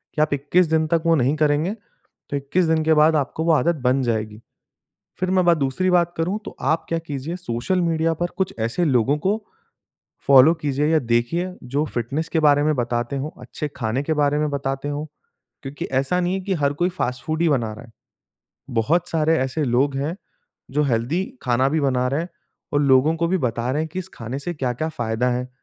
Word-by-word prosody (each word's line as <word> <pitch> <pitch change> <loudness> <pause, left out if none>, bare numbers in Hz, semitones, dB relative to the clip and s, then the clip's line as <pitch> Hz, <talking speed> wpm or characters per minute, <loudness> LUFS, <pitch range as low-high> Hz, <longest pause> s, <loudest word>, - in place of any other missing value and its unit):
कि 150 - +1
आप 155 -1 +2
21 150 +6 +2
दिन 160 0 +1
तक 165 0 +1
वो 165 - +5
नहीं 140 +1 +2
करेंगे 155 +5 +1 0.6
तो 145 - -1
21 145 +6 0
दिन 160 -1 +2
के 160 - +4
बाद 155 +1 +5
आपको 145 +3 -2
वो 170 - +4
आदत 170 +2 +2
बन 130 +2 +2
जाएगी। 110 -2 -2 0.8
फिर 185 0 0
मैं 185 -1 +3
बात 170 -1 +5
दूसरी 140 +7 0
बात 175 -1 +3
करूँ 180 +6 0
तो - - -9
आप 160 +4 0
क्या 165 - 0
कीजिए 155 +1 -5
सोशल 180 +3 -1
मीडिया 165 -1 +1
पर 175 +2 -1
कुछ 190 -1 -1
ऐसे 115 +11 0
लोगों 130 +1 +2
को 210 +3 0 0.8
फॉलो 140 +4 +7
कीजिए 145 +1 0
या 160 0 +4
देखिए 125 +9 0
जो 140 +5 -1
फिटनेस 135 +7 -2
के 160 - +1
बारे 145 -1 +4
में 155 0 +2
बताते 120 +1 -1
हो, 135 +3 -3
अच्छे 150 - -5
खाने 115 +3 -1
के 155 +2 -1
बारे 145 -1 +2
में 150 0 0
बताते 135 0 -3
हो। 145 +1 -3 0.6
क्योंकि 135 +1 -6
ऐसा 135 +8 +1
नहीं 180 +1 0
है 195 - -2
कि 190 0 -2
हर 140 0 +3
कोई 175 +5 +1
फास्ट 125 -8 -3
फूड 160 +1 -1
ही 170 - +4
बना 115 -6 0
रहा 120 +2 -11
है। 115 - -15 0.9
बहुत 170 +9 +1
सारे 160 0 +2
ऐसे 130 +4 -1
लोग 135 +2 +1
हैं 150 +6 -2 0.6
जो 150 +1 +2
हेल्दी 135 +9 0 0.2
खाना 130 +1 +2
भी 160 0 +1
बना 125 -2 +1
रहे 140 +4 0
हैं 170 - -5 0.5
और 145 - +3
लोगों 140 +3 +4
को 170 - 0
भी 190 +2 +1
बता 120 -3 -1
रहे 150 +2 0
हैं 160 - -4
की 185 - -4
इस 185 - -9
खाने 120 +4 -5
से 175 +4 -4
क्या-क्या 130 +2 -2
फायदा 120 -3 -1
हैं। 125 +1 -2
145 Hz, 215 wpm, -22 LUFS, 130-165 Hz, 0.9 s, फॉलो